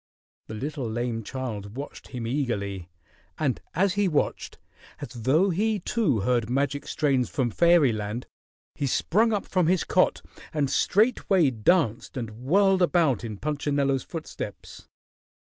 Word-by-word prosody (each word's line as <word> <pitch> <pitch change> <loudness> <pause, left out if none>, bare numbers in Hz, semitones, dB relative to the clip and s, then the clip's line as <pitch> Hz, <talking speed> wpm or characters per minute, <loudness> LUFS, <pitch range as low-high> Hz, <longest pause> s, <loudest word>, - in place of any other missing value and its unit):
The 110 - -7
little 135 0 -4
lame 120 0 -2
child 110 -4 -6
watched 140 +1 -8
him 120 -3 -6
eagerly, 100 - -2 0.5
and 140 -5 -1
as 190 +3 +2
he 205 0 +1
watched, 155 -5 -1 0.4
as 145 - -6
though 135 - +2
he 215 +5 +1
too 175 - 0
heard 120 0 +1
magic 140 +2 -1
strains 135 -5 +1
from 125 -4 -1
fairyland, 125 -8 +2 0.5
he 140 - -2
sprung 220 - +2
up 205 -2 -1
from 180 -3 +1
his 180 0 +2
cot - - +2 0.3
and 145 -3 0
straightway 195 - +3
danced 120 - +1
and 115 -3 -4
whirled 185 - +2
about 165 - +2
in 110 -3 -5
Punchinello's 140 -1 0
footsteps. 155 - -8
140 Hz, 135 wpm, -26 LUFS, 120-175 Hz, 0.5 s, straightway